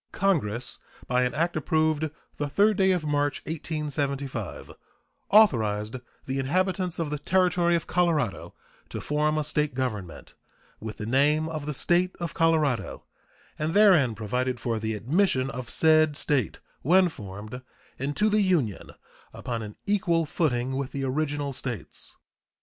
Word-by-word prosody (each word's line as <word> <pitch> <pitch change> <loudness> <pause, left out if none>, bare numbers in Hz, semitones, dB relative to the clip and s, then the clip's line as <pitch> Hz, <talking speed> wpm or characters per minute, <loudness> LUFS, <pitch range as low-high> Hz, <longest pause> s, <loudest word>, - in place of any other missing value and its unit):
Congress, 125 - 0 0.3
by 125 0 +1
an 125 -1 0
act 170 +3 0
approved 155 0 +1 0.3
the 145 - -1
3d 205 +8 +3
day 190 0 +3
of 180 -4 +1
March, 145 -1 0
1875, 140 - -3 0.6
authorized 110 - +3 0.3
the 135 +1 -2
inhabitants 180 +5 0
of 160 -3 -2
the 150 - -2
Territory 180 0 +2
of 165 - -1
Colorado 165 - 0 0.3
to - - -5
form 150 +1 0
a 155 - +1
State 150 -2 -1
government, 105 -9 -4 0.5
with 110 -1 -7
the 105 - -5
name 145 +6 +2
of 155 -2 -5
the 150 - -2
State 180 +5 +2
of 170 -2 -4
Colorado, 160 -6 +1 0.6
and 155 +3 -1
therein 175 - +5
provided 125 +4 -2
for 115 -1 -2
the 110 0 -2
admission 135 - +1
of 125 -2 -6
said 155 -2 +3
State, 140 -9 -1 0.2
when 185 +5 +5
formed, 105 - -8 0.4
into 145 +11 0
the 215 0 +3
Union 165 - 0 0.4
upon 120 -3 -4
an 105 -1 -8
equal 185 -5 +1
footing 130 -5 -1
with 140 -1 -4
the 140 -1 -3
original 145 +1 -1
States. 125 -3 -6
145 Hz, 145 wpm, -26 LUFS, 125-170 Hz, 0.6 s, therein